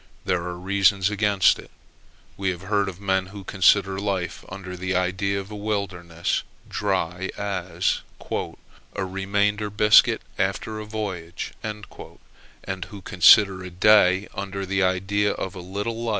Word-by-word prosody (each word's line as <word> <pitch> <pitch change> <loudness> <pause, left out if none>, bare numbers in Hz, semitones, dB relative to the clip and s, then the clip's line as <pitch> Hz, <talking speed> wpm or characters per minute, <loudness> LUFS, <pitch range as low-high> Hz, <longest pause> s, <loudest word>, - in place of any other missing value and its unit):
There 90 - +1
are 90 0 -5
reasons 100 +1 +2
against 105 -2 +3
it. - - -12 0.7
We 95 -1 -1
have 90 0 -4
heard 100 0 +1
of 90 -1 -10
men 95 -2 0
who 100 +1 -10
consider 95 +1 +3
life 95 -3 -2
under 95 -1 -7
the 95 +1 -2
idea 95 +2 0
of 100 +2 -8
a - - -6
wilderness 95 -5 -2 0.3
dry 95 -2 -2
as 95 -3 -1 0.3
"a 95 - -5
remainder 100 +2 0
biscuit 105 +1 +5 0.2
after 100 +3 -1
a 105 - -6
voyage:" 95 -6 -5
and 105 -1 -5 1.0
who 100 -2 -11
consider 95 +1 +6
a 90 - -6
day 95 +1 +4
under 100 0 -4
the 100 +1 0
idea 95 +2 +1
of 95 - -5
a 95 - -8
little 105 +6 -4
life. 115 - -1
95 Hz, 145 wpm, -24 LUFS, 95-105 Hz, 1.0 s, consider